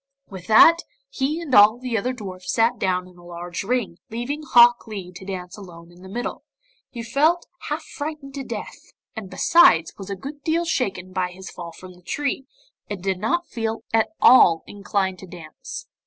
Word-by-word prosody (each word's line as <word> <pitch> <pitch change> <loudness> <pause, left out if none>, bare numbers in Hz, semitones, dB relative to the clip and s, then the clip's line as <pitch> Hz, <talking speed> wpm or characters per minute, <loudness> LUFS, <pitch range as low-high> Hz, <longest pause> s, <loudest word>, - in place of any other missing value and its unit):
With 185 -2 -9
that, 275 +10 +8 0.3
he 280 +4 -1
and 305 -6 -6
all 210 +2 +7
the 250 -1 -4
other 240 +4 0
dwarfs 185 -6 -6
sat 230 +1 +2
down 180 -1 0
in 180 -1 -18
a - - -16
large 175 +1 -6
ring, 215 -5 -2
leaving 240 +7 -4
Hok 240 -5 +5
Lee 195 -5 -7
to 180 - -11
dance 185 -1 -7
alone 170 -3 -12
in 175 +1 -18
the 190 - -11
middle. 240 +5 -5 0.5
He 235 -2 -7
felt 310 +9 +2 0.2
half 305 +2 -3
frightened 295 -2 -7
to 275 -1 -5
death, - - -8 0.2
and 215 -4 -7
besides 175 - +4
was 195 0 -8
a 200 - -3
good 280 +9 -9
deal 330 +2 0
shaken 190 - -2
by 185 -1 -1
his 185 +1 -10
fall 170 -1 -8
from 185 +2 -12
the 180 - -20
tree 275 +6 -3 0.4
and 200 -4 -6
did 190 -1 -1
not 345 - 0
feel 225 -4 -4
at 225 -1 +3
all 170 -10 +6
inclined 195 -2 -2
to 190 - -11
dance. 180 - -9
205 Hz, 190 wpm, -23 LUFS, 185-260 Hz, 0.5 s, that